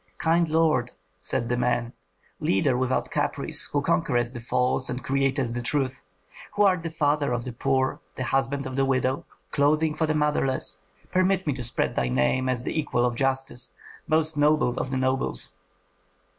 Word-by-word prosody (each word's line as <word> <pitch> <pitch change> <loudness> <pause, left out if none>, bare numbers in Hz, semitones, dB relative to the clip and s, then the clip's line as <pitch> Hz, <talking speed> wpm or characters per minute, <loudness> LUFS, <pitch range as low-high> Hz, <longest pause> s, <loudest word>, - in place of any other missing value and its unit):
"Kind 165 0 +2
lord," 155 -6 +2 0.3
said 115 +5 -1
the 125 - 0
man, 120 -1 0 0.5
"leader 120 +7 +2
without 130 0 0
caprice, - - 0
who - - -1
conquerest 120 +8 +1
the 120 - -7
false 125 +2 0
and 125 +1 -4
createst 135 -2 0
the 120 - -2
true, 135 +1 +1 0.7
who 205 - +4
art 185 -3 +4
the 165 - -4
father 150 -3 +1
of 120 -1 -1
the 125 - -6
poor, 130 +2 0 0.2
the 130 - -3
husband 135 +2 0
of 130 -1 -5
the 135 - +2
widow, 130 0 0 0.3
clothing 150 +2 +2
for 160 +1 0
the 155 - +1
motherless, 150 -3 +1 0.3
permit 185 +1 +2
me 150 - +1
to 130 - -6
spread 120 0 0
thy 65 - 0
name 65 - +1
as 125 -1 -1
the 160 - -2
equal 125 -5 +1
of 120 - +1
justice, 135 -1 -2 0.3
most 155 -1 +1
noble 145 -4 +3
of - - -2
the 130 - -1
nobles." 130 -6 0
135 Hz, 175 wpm, -26 LUFS, 125-150 Hz, 0.7 s, who